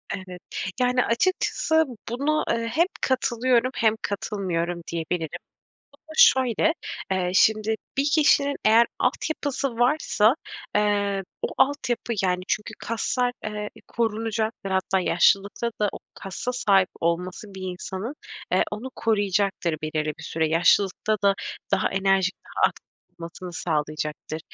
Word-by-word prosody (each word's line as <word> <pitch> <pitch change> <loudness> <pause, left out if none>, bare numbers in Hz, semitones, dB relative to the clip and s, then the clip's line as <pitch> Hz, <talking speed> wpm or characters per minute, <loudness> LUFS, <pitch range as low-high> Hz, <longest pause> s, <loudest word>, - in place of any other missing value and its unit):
Evet. 185 -2 -9 0.4
Yani, 250 0 +3
açıkçası 320 +4 +2 0.3
buna, 285 +6 0
eee, 230 0 0
hem 330 +7 +3 0.2
katılıyorum 255 -1 +2
hem 220 -1 +3
katılmıyorum 175 -4 -2
diyebilirim. 165 -1 -3 0.5
Bu 285 - -21
da 315 0 -14
şöyle, 260 +5 +5 0.4
eee, 185 -1 0
şimdi 215 +1 +4 0.2
bir 280 +2 +3
kişinin 285 -2 +4
eğer 225 +2 +6
altyapısı 285 -3 -1
varsa, 245 -3 +3 0.4
eee, 205 -1 +1 0.2
o - - 0
altyapı 255 -4 +1
yani 180 -1 +1
çünkü 210 - -1
kaslar, 245 +2 -1
eee, 210 -1 -4 0.2
korunacaktır. 225 -2 -2
Hatta 190 0 +1
yaşlılıkta 200 +6 +2
da 210 - +3
o - - -7 0.2
kasa 195 +6 -5
sahip 195 -6 +3
olması 180 +4 -2
bir 190 - -8
insanın, 190 +6 -5 0.4
eee, - - +4
onu 225 +5 -5
koruyacaktır 200 -5 +1
belirli 155 0 -1
bir - - -10
süre. 160 -1 -1
Yaşlılıkta 185 +6 +3
da 200 -1 +4 0.4
daha 195 - +2
enerjik, 195 -1 +2
daha - - +2
aktif - - -15 0.3
olmasını 170 +1 -8
sağlayacaktır. 155 -1 -3
210 Hz, 125 wpm, -25 LUFS, 185-240 Hz, 0.5 s, eğer